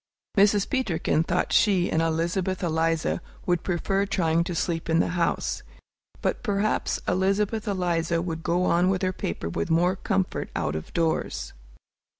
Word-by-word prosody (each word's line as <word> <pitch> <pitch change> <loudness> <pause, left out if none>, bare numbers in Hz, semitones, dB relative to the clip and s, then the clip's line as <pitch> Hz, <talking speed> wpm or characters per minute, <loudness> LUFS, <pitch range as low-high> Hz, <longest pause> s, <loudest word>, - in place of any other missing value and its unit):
Mrs. 205 -1 +4
Peterkin 205 - 0
thought 170 +2 0
she 195 -5 +3
and 160 - +2
Elizabeth 170 +4 -1
Eliza 165 0 0 0.2
would 175 -2 +1
prefer 195 +2 0
trying 165 -3 +1
to 175 - -3
sleep 165 0 -2
in 165 0 +3
the - - +2
house. 175 -2 -1 0.6
But - - 0
perhaps 210 -1 0
Elizabeth 200 +4 +1
Eliza 170 -4 0
would 165 -2 -3
go 175 +2 +1
on 180 0 +3
with 190 0 0
her 185 0 +1
paper 85 - -4
with 85 0 -2
more 175 +3 +3
comfort 190 -1 -1
out - - -1
of 80 - -6
doors. 165 -2 -1
175 Hz, 155 wpm, -26 LUFS, 165-195 Hz, 0.6 s, Mrs